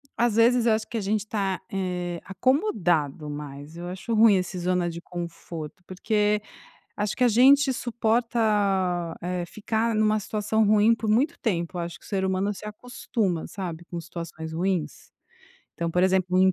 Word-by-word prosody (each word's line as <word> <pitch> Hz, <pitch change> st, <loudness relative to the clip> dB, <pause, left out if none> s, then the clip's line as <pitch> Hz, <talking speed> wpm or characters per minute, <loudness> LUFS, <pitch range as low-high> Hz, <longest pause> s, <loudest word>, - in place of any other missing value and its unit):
às 235 Hz, -2 st, +1 dB
vezes 235 Hz, +1 st, +4 dB
eu 225 Hz, -, +5 dB
acho 220 Hz, 0 st, -1 dB
que 235 Hz, -, -4 dB
a -, -, -1 dB
gente 205 Hz, +2 st, 0 dB
está, 195 Hz, -3 st, -2 dB
eh, 180 Hz, -2 st, -2 dB
acomodado 180 Hz, -, +1 dB
mais, 145 Hz, +1 st, -7 dB
eu 175 Hz, +1 st, -6 dB
acho 185 Hz, +6 st, -4 dB
ruim 220 Hz, -1 st, +6 dB
esse 180 Hz, 0 st, -3 dB
zona 180 Hz, 0 st, +1 dB
de 170 Hz, 0 st, -5 dB
conforto, 170 Hz, -1 st, -7 dB
porque 210 Hz, +2 st, +1 dB, 0.6 s
acho 210 Hz, -1 st, -1 dB
que -, -, -1 dB
a 250 Hz, -, +6 dB
gente 265 Hz, +4 st, +6 dB
suporta, 235 Hz, 0 st, 0 dB, 0.8 s
eh, 180 Hz, 0 st, -2 dB
ficar 220 Hz, +4 st, -1 dB
numa 215 Hz, 0 st, +3 dB
situação 215 Hz, +1 st, 0 dB
ruim 215 Hz, +2 st, +5 dB
por 225 Hz, -1 st, -2 dB
muito 265 Hz, +10 st, +2 dB
tempo, 175 Hz, -6 st, -2 dB
acho 170 Hz, 0 st, -5 dB
que -, -, -20 dB
o -, -, -13 dB
ser 195 Hz, -2 st, -1 dB
humano 190 Hz, +2 st, 0 dB
se 205 Hz, -, -10 dB
acostuma, 210 Hz, -5 st, -3 dB
sabe, 175 Hz, -4 st, -6 dB
com 170 Hz, 0 st, -6 dB
situações 165 Hz, -1 st, -7 dB
ruins. 175 Hz, 0 st, -2 dB, 0.6 s
Então, 170 Hz, -, -2 dB
por 180 Hz, +2 st, +2 dB
exemplo 185 Hz, -1 st, +2 dB
o -, -, +5 dB
im 190 Hz, 0 st, +5 dB
195 Hz, 175 wpm, -26 LUFS, 175-220 Hz, 0.8 s, ruim